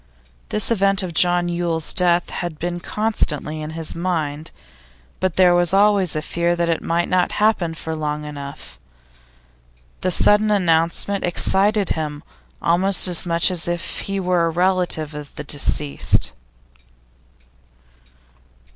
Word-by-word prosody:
This 215 +2 -1
event 195 -3 +2
of 175 -2 -5
John 175 +1 +3
Yule's 170 -2 -2
death 175 -1 +1
had 175 -3 -5
been 175 +2 -4
constantly 160 -8 -2
in 155 - -5
his 165 -1 -1
mind, 160 -3 -3 0.7
but 185 -3 -1
there 180 -1 +5
was 175 +1 +2
always 200 -4 +3
a 155 - -2
fear 170 +2 -1
that 170 0 -1
it 165 - 0
might 170 +1 -1
not 180 -1 +1
happen 205 -6 +1
for 160 0 -5
long 150 -1 -3
enough; 140 -1 -9 1.2
the 185 - 0
sudden 210 +4 +4
announcement 180 0 +1
excited 195 +3 +1
him 150 -1 -3 0.4
almost 185 +3 +3
as 180 0 -1
much 170 +2 +2
as 175 -2 -1
if 175 0 -4
he 195 0 -3
were 180 -2 +1
a - - 0
relative 175 -3 0
of 150 -1 -9
the - - -6
deceased. 145 0 +1
175 Hz, 140 wpm, -20 LUFS, 160-185 Hz, 1.2 s, there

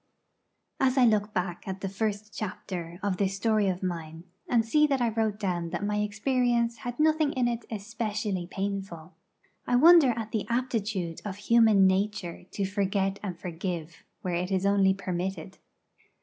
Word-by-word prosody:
As 265 0 +2
I 255 - +6
look 210 -2 +2
back 180 -2 -3
at 190 0 -5
the 195 - -2
first 210 +1 -3
chapter 185 -4 -5
of 200 -2 0
this 195 -1 0
story 215 0 +2
of 185 0 -2
mine, 165 -2 -4 0.3
and 230 -2 +3
see 300 +6 +4
that 275 -2 +1
I 240 -1 +2
wrote 220 -2 -1
down 175 -4 -2
that 205 - -3
my 210 0 0
experience 235 +3 +1
had 245 +3 -6
nothing 310 -1 +3
in 250 -2 +1
it 235 -1 -3
especially 210 -3 -3
painful, 190 -3 -5 0.5
I 245 - +2
wonder 320 +1 +7
at 220 -1 -4
the 215 -3 -2
aptitude 220 -8 -2
of 205 -3 -4
human 215 -1 +4
nature 190 -2 0
to 200 - -2
forget 195 0 -1
and 185 -4 -5
forgive, 170 -2 -5 0.2
where 180 - -2
it 180 +2 -2
is 190 0 +1
only 195 -1 +4
permitted. 185 0 -4
205 Hz, 165 wpm, -28 LUFS, 185-225 Hz, 0.5 s, wonder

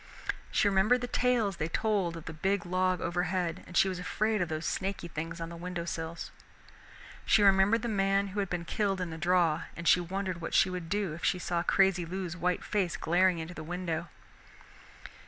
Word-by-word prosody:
She 210 - +2
remembered 210 +6 +3
the 245 - -2
tales 240 -6 +1
they 155 - -1
told 185 -2 0
of 165 - -10
the 165 - -6
big 190 +4 0
log 185 0 +1
overhead 175 -1 -1
and 175 - -4
she - - +5
was 185 -2 -3
afraid 215 +3 0
of 175 - -1
those 155 +1 -3
snaky 190 -2 -2
things 165 +1 -5
on 165 0 -4
the 170 - -8
windowsills. 170 -1 -5 0.9
She 210 - +4
remembered 200 +3 +4
the - - -1
man 195 -2 +1
who 200 +2 -4
had 195 -2 -1
been 175 -1 -3
killed 195 0 0
in 180 -2 -3
the 160 - -7
draw, 170 -2 +2
and 170 0 -4
she 180 - +6
wondered 185 0 -3
what 165 - -3
she 185 - +4
would 180 -2 -5
do 200 -4 -1
if 165 - -9
she 180 - +2
saw 175 -1 -1
crazy 190 0 +3
Lou's 175 0 -4
white 180 +1 -1
face 190 -5 -1
glaring 180 +2 +3
into 165 +2 -6
the 155 - -7
window. 170 0 -3
180 Hz, 200 wpm, -30 LUFS, 170-195 Hz, 0.9 s, she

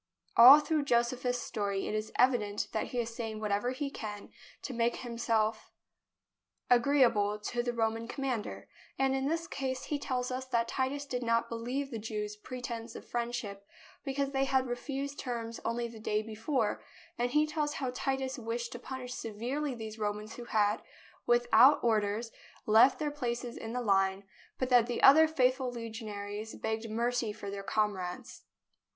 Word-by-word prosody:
All 260 +5 +11
through 300 -1 0
Josephus's 245 0 +1
story 200 -4 -2
it - - -3
is 215 0 -2
evident 225 -5 +2
that 220 - -1
he 250 - -6
is 230 -1 -3
saying 220 -2 -4
whatever 210 +2 0
he 275 +2 -3
can 210 -4 -7 0.3
to 265 - -4
make 235 0 +1
himself 230 -3 -1 1.0
agree 270 +3 +5
THE 245 - +7
BOOK - - -7
OF 205 - +4 0.2
FAMOUS - - 0
SIEGES - - -9
able 240 - +1
to - - -7
the 240 - -11
Roman 225 0 0
commander, 255 -4 -3 0.3
and 270 0 +2
in 270 0 0
this 330 +2 -1
case 265 -4 -3
he 295 - -2
tells 255 -2 -2
us 255 +1 -3
that 235 -2 +1
Titus 270 +3 -2
did 250 -3 -3
not 230 -1 +1
believe 250 +5 -3
the 230 - -4
Jews' 210 -1 -4
pretence 235 0 -6
of - - -9
friendship, 235 -4 -3 0.4
because 275 0 -1
they 270 0 +1
had 265 -1 +2
refused 275 +3 -4
terms 230 -2 -4
only 235 +1 -1
the 230 -1 -11
day 215 0 -1
before; 225 +1 -1 0.4
and 245 +1 +1
he 300 +4 +3
tells 300 -1 -2
how 260 -2 -2
Titus 265 0 -2
wished 235 +1 -3
to 240 - -7
punish 255 0 -6
severely 250 +6 -3
these 220 -1 -7
Romans 210 +1 -3
who 240 - -8
had, 210 -2 +1 0.5
without 240 +3 +6
or 225 -2 +4
ders, 210 +3 -3 0.3
left 220 +5 +6
their 300 -1 -2
places 245 -4 -3
in 225 +1 -6
the 250 - -1
line, 195 -2 +2 0.3
but 255 - -1
that 245 -2 +5
the 240 - -3
other 315 +4 +9
faithful 260 -4 +1
legionaries 220 -2 -6
begged 220 +1 -3
mercy 235 0 0
for 205 -1 -7
their 200 0 -5
com 210 +1 +1
rades. 180 -1 -7
240 Hz, 180 wpm, -31 LUFS, 220-260 Hz, 1.0 s, All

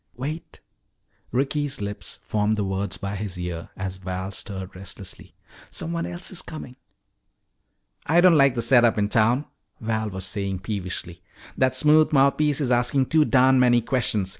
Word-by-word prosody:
"Wait," 150 +6 -6 0.7
Ricky's 145 +2 -1
lips 100 0 -6
formed 105 0 0
the 105 - 0
words 95 0 -3
by 100 0 -4
his 100 -2 -4
ear 85 -2 -5
as 95 -1 -4
Val 95 0 -5
stirred 95 -2 -5
restlessly. 95 0 -9 0.3
"Someone 170 0 -3
else 175 0 -4
is 185 - -5
coming." 145 -5 -9 1.3
"I 165 +3 +4
don't 180 0 +7
like 140 -3 +5
the 120 - +1
set 125 -3 +5
up 115 -2 +3
in 105 0 +1
town," 120 +6 +2 0.3
Red 110 -1 -2
was 95 -1 -5
saying 100 -1 -3
peevishly. 90 -3 -5 0.3
"That 130 -1 +2
smooth 155 +1 +4
mouthpiece 140 +1 +3
is 135 -4 0
asking 125 +2 +2
too 155 -1 +4
darn 130 -1 +4
many 120 -1 +5
questions. 110 -5 -1
115 Hz, 160 wpm, -24 LUFS, 95-140 Hz, 1.3 s, don't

